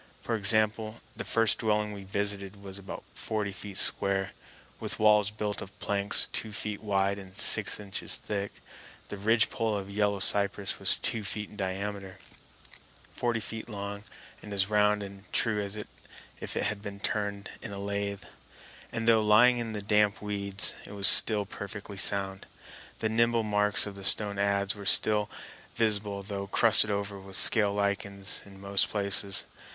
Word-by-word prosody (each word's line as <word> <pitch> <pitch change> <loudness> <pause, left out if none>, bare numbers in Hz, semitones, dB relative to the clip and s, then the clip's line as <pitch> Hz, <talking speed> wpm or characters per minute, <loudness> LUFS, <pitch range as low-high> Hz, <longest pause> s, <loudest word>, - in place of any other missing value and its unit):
For 115 - -3
example, 110 +1 +1 0.2
the - - -6
first 115 -2 +2
dwelling 105 -1 -1
we 100 -1 -9
visited 100 0 -3
was 95 0 -9
about 95 -1 -9
forty 105 -2 -4
feet 100 +1 -9
square, 95 -1 +1 0.5
with - - -3
walls 105 -1 +3
built 105 -1 -5
of 100 - -11
planks 100 0 +3
two 110 - -4
feet 105 -1 -5
wide 100 -1 -1
and 95 -1 -11
six - - +4
inches 100 -2 -5
thick. 100 -1 -6 0.5
The 105 - -6
ridgepole 110 +1 0
of 100 0 -8
yellow 100 0 0
cypress 100 0 +3
was - - +3
two 110 - -3
feet 105 0 -5
in - - -14
diameter, 95 0 -5 1.0
forty 120 -2 -2
feet 115 +1 -8
long, 100 -1 -7 0.4
and 105 - -11
as 100 +1 -1
round 105 0 +2
and 100 0 -13
true 110 -2 0
as 100 0 -5
if 105 - -7 0.7
it - - -1
had 105 -1 -3
been 100 -1 -8
turned 100 -1 -3
in 110 - -8
a 100 - -7
lathe; 100 0 -4 0.7
and, 115 0 -4
though 115 -1 +4
lying 115 +4 +4
in 115 -2 -5
the 105 -1 -6
damp 105 0 +1
weeds, 100 -1 +1
it - - -12
was 100 -1 -1
still 105 -2 +6
perfectly 100 0 -8
sound. 95 -1 +1 0.5
The 110 - -2
nibble 115 +1 +1
marks 105 -3 +2
of 100 - -7
the 100 0 -11
stone 100 +1 +4
adze 100 0 0
were 105 - -11
still 105 -1 +3 0.5
visible, 105 -3 -1
though 100 -1 -6
crusted 110 +1 +5
over 100 -1 -4
with 95 0 -10
scale 105 -2 +3
lichens 100 -1 -1
in 95 -1 -15
most 100 0 0
places. 100 -1 +3
100 Hz, 165 wpm, -28 LUFS, 100-105 Hz, 1.0 s, still